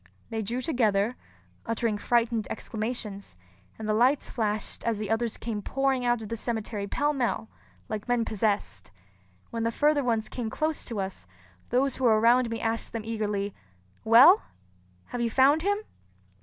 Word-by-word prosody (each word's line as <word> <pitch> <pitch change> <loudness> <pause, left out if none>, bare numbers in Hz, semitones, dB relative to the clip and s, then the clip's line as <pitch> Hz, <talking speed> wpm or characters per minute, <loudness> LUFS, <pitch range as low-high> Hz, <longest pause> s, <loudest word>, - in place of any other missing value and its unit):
They 225 -1 -1
drew 240 +5 -3
together, 225 -5 +1 0.5
uttering 230 -2 -1
frightened 230 -1 +1
exclamations; 215 - -5 0.4
and 220 - -6
the 215 - +2
lights 255 +6 +2
flashed 215 -3 -2
as 230 -2 0
the 210 0 -3
others 225 0 0
came 220 -3 -4
pouring 270 +2 0
out 240 -2 +1
of 210 - -8
the 230 - -2
cemetery 220 -3 -3
pell 295 +8 0
mell, 245 -4 -1 0.4
like 215 -1 -5
men 245 -2 +1
possessed. 205 - -1 0.6
When 230 - -3
the 230 0 +1
further 295 +3 +2
ones 225 -3 0
came 235 -3 -4
close 310 +6 -2
to 225 -3 -4
us, 190 - -5 0.4
those 260 +2 +1
who 260 - -1
were 220 -2 +5
around 240 +2 +4
me 230 0 -3
asked 225 0 -2
them 225 -2 -4
eagerly, 210 -3 -2 0.5
"Well, 255 - +8 0.6
have 245 - -5
you 235 - +1
found 270 +6 +4
him?" 405 +3 +1
230 Hz, 165 wpm, -27 LUFS, 215-250 Hz, 0.6 s, Well